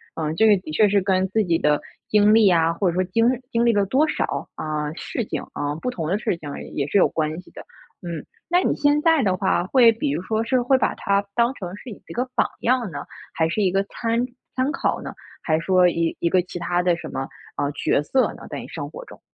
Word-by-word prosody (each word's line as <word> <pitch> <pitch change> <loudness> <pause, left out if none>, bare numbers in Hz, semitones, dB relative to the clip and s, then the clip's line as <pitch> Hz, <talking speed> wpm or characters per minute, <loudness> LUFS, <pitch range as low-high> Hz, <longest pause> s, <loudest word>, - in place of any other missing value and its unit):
嗯， 155 -1 -2
这 220 +3 +4
个 210 - +7
的 155 - -8
确 210 +7 +4
是 200 -1 +3
跟 190 0 +1
自 220 +1 +1
己 170 -3 +1
的 150 0 +2 0.3
经 210 0 +4
历 220 -3 +6
啊， 165 -2 +3
或 180 +1 0
者 - - -2
说 185 - +2
经 225 +6 +1 0.3
经 235 +1 +2
历 235 - +4
了 205 -1 +3
多 280 +8 +3
少， - - -2
啊， 150 -1 -3
事 225 +6 -4
情， - - -4
啊 145 0 -2
不 250 - -1
同 165 -9 -4
的 190 +5 +1
事 175 - -1
情 145 -3 -8 0.2
也 140 -1 -1
是 200 - +1
有 - - +5
关 155 0 -2
系 - - -19
的。 - - -10 0.4
嗯， 170 -3 -5 0.2
那 350 +1 +3
你 - - +1
现 290 +1 +2
在 325 -3 +4
的 190 -3 +2
话， 185 -2 +1
会 235 +2 +6
比 225 -10 -2
如 150 +4 -2
说 220 +4 -1
是 250 +2 +1
会 260 +2 +3
把 - - +1
她 200 -1 0
当 235 +1 +3
成 180 -4 -7
是 250 - -10
一 210 - -8 0.2
个 250 +2 -2
榜 - - +3
样 240 -4 +1
呢， 140 -2 -6 0.3
还 160 0 +1
是 210 - -1
一 185 - +2
个 195 +1 +1
参 230 +3 -1 0.3
参 260 +3 +1
考 340 - -1
呢？ - - -7 0.3
还 155 -1 +1
说 180 +1 +4
一 170 -1 -1
一 170 - +1
个 185 - +3
其 180 0 -7
他 175 +1 0
的 175 -1 +3
什 170 -2 -8
么， 135 0 -4 0.3
呃， 145 - 0
角 145 0 +1
色 260 - +1
呢？ - - -12
在 - - -4
你 - - -8
生 - - -6
活 - - -9
中。 - - -14
190 Hz, 270 characters per minute, -23 LUFS, 165-230 Hz, 0.4 s, 个